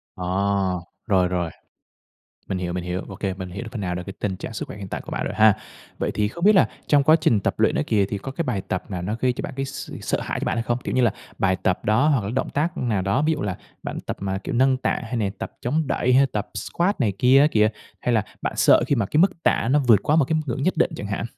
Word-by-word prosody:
Ờ, 90 - -5 0.8
rồi, 95 -4 +3
rồi. 90 -2 -1 1.0
Mình 95 - -1
hiểu, 90 -1 -3
mình 90 0 -3
hiểu. 90 +1 -2
Ô 95 - -7
kê, 95 -1 -2
mình 95 -1 -6
hiểu 100 +6 -6
phần 115 - -4
nào 90 -2 -2
được 90 - -4
cái 95 - -5
tình 95 -2 -1
trạng 105 - -7
sức 105 - -5
khỏe - - -8
hiện 100 -2 -7
tại - - -4
của - - -10
bạn - - -2
rồi - - -3
ha. 110 -1 +6 0.4
Vậy - - -1
thì 105 -1 +1
không 170 +8 -5
biết 210 +1 +7
là 190 - +5 0.2
trong 145 -2 +4
quá 155 +3 +6
trình 110 -8 +3
tập - - 0
luyện - - +3
đó - - +1
kìa 105 -3 +3
thì 100 - -3
có 135 - -7
cái 170 - -2
bài 120 -8 -1
tập 95 +2 -3
nào 90 -2 -3
nó 105 +5 -2
gây 130 -1 +2
cho - - -6
bạn 145 - -5
cái 135 - -1
s 135 - -7
sợ - - -1
hãi - - -3
cho - - -2
bạn - - -1
hay 115 - 0
không? 120 +1 -1
Kiểu - - -2
như 130 - +3
là, 115 -4 +3 0.3
bài 95 -1 +2
tập 90 - -1
đó 110 +9 +3
hoặc 130 -9 +2
là 100 - -3
động 130 - -1
tác 165 +5 -1
nào 110 -6 0
đó, 100 +9 +1
ví 155 +1 +2
dụ 150 - -2
là 95 -3 -3 0.2
bạn - - -5
tập - - -5
mà 95 0 -2
kiểu 95 - -5
nâng 130 +2 +4
tạ 130 - -1
hay 115 +2 -4
nè 105 -4 0
tập - - -5
chống 150 +6 0
đẩy 125 -2 +1
hay 135 +2 +6
tập 105 -5 -4
squat 180 +2 -1
này 110 -6 +2
kia 130 +2 +6
á 145 - +6
kìa? 105 -4 +4 0.3
Hay 125 - 0
là 110 -2 +2 0.2
bạn - - -1
sợ - - +5
khi - - +2
mà 115 -7 0
cái 150 - 0
mức 170 -2 +3
tạ 115 - +2
nó 145 - +4
vượt 110 -5 +6
quá 150 - +2
một 155 - +5
cái 160 +3 0
ngưỡng 135 +2 -2
nhất 185 - +2
định 165 - +3
chẳng 105 - -5
hạn? 100 +2 -3
115 Hz, 300 wpm, -23 LUFS, 95-135 Hz, 1.0 s, biết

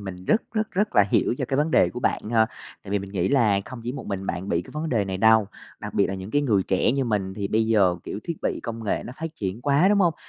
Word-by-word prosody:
mình 95 -2 -8
rất, 220 - +2
rất, 215 -1 -1
rất 205 +3 -1
là 105 - +8
hiểu - - +2
cho - - -1
cái 135 - 0
vấn 150 +2 +1
đề - - +4
của 125 - -6
bạn 110 - -1
ha. 110 -1 +4 0.4
Tại - - -10
vì 100 - +1
mình 95 0 -8
nghĩ 95 -2 0
là 110 -8 +3
không 130 - -9
chỉ 125 - -3
một 135 - -7
mình 95 -1 -4
bạn 90 +3 -3
bị 85 +1 0
cái - - -14
vấn 155 +1 -3
đề 110 -8 +1
này 95 -1 -3
đâu, 110 0 +5 0.3
đặc - - -7
biệt - - +3
là 95 - -4
những 95 +1 -7
cái 145 +3 +2
người 105 -8 +2
trẻ 95 +6 +1
như 135 -1 0
mình, 100 -4 -1
thì 100 -2 -3
bây 110 +1 +1
giờ, 100 -6 +3
kiểu, 100 - -5
thiết 170 - -4
bị - - -1
công 115 -1 -5
nghệ 100 - -1
nó 125 - -7
phát 165 +1 -4
triển 100 +3 -4
quá, 145 +6 +4
đúng 205 0 +3
hông? 175 -4 +3
110 Hz, 305 wpm, -24 LUFS, 95-140 Hz, 0.4 s, là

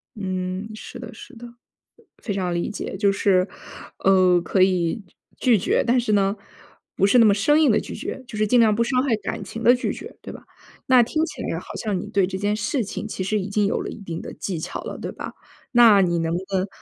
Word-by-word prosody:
嗯， 185 0 -4
是 - - -10
的 225 - -9
是 275 +4 -13
的， 240 +1 -10 0.7
非 205 - -3
常 185 -2 -2
理 170 0 -2
解。 205 - -5
就 200 0 +3
是， 195 -1 +2 0.5
呃， 185 -2 +4
可 185 +2 0
以 185 +2 +2 0.4
拒 245 -3 +4
绝， 190 - +1
但 245 +2 +3
是 235 -3 -1
呢， 200 -1 +2 0.6
不 195 - +3
是 225 - +4
那 230 - +7
么 205 - +5
生 295 +10 +3
硬 310 - +5
地 - - +3
拒 - - -8
绝， 260 - -6
就 225 - -8
是 215 - +2
尽 245 +4 +3
量 220 -2 +4
不 235 - +2
伤 255 +1 +1
害 260 -5 +2
感 210 - -5
情 225 - -7
地 245 - +7
拒 250 - -2
绝， - - -10
对 - - -9
吧？ - - -12 0.4
那 255 -1 +6
听 310 +7 0
起 - - -8
来 - - -3
好 - - -15
像 205 -4 -1
你 - - -6
对 195 -2 +1
这 190 0 -4
件 205 +1 0
事 225 +4 -1
情 210 +2 -6
其 195 - -4
实 210 +3 0
已 190 - -4
经 205 +1 +1
有 200 - 0
了 - - -5
一 - - -9
定 170 -4 -6
的 - - -8
技 180 -5 -4
巧 175 - -5
了， - - -7
对 - - -5
吧？ - - -8 0.4
那 230 -5 +7
你 175 -2 +1
能 165 0 -1
不 175 - 0 0.2
能 190 +1 0
205 Hz, 260 characters per minute, -23 LUFS, 185-230 Hz, 0.7 s, 那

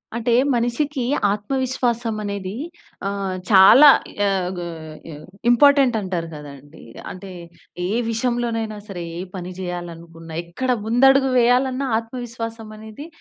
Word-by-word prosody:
అంటే, 235 0 0 0.2
మనిషికి 245 +3 -1 0.3
ఆత్మవిశ్వాసమనేది 220 -4 -2 0.5
ఆహ్, 195 -1 -3 0.2
చాలా 225 +9 +8 0.3
యాహ్ 190 -3 0
గో 175 - -5 0.4
యాహ్, 150 0 -10 0.2
ఇంపార్టెంటంటారు 240 - +3
కదండీ! 145 0 -12 0.3
అంటే, 190 +1 -10 0.6
ఏ - - -4 0.2
విషయంలోనైనా 230 -2 -2
సరే! 180 -4 -6
ఏ - - -5 0.2
పని 180 0 -6
జేయాలనుకున్నా, 170 -2 -7
ఎక్కడ 175 +10 -5 0.2
ముందడుగు 270 +3 +4
వేయాలన్నా, 255 +3 +2
ఆత్మవిశ్వాసమనేది 230 +1 -7
220 Hz, 95 wpm, -21 LUFS, 185-245 Hz, 0.6 s, చాలా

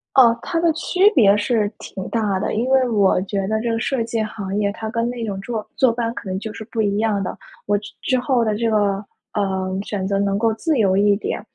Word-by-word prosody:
哦， 235 -3 +6
它 335 - -2
的 335 0 +3
区 365 +4 +3
别 205 -7 +6
是 210 0 +1
挺 190 - -7
大 210 -4 0
的。 200 - -2
因 230 +4 0
为 260 -1 +3
我 200 -5 +3
觉 195 -1 -2
得 220 +1 0
这 235 0 -1
个 225 - -1
设 255 0 0
计 225 0 -2
行 200 -2 -5
业 205 -1 +1
它 220 +1 -5
跟 230 +1 -1
那 245 -1 -5
种 200 -3 -4
坐 220 0 -4
坐 260 -3 +4
班 230 0 -2
可 205 - -7
能 185 - -2
就 220 +1 -6
是 220 - -8
不 225 - -2
一 205 -1 +1
样 215 -2 +1
的。 185 - -5 0.3
我 205 0 +2
之 205 0 -9
之 255 -1 +1
后 245 -1 +1
的 215 -2 +1
这 230 +1 0
个， 205 -2 +1 0.3
呃， 190 -2 -1
选 195 -3 -3
择 195 0 0
能 200 0 +1
够 225 +1 +2
自 300 +7 0
由 195 -4 +3
一 205 0 +4
点， 205 - -3
215 Hz, 265 characters per minute, -21 LUFS, 200-235 Hz, 0.3 s, 哦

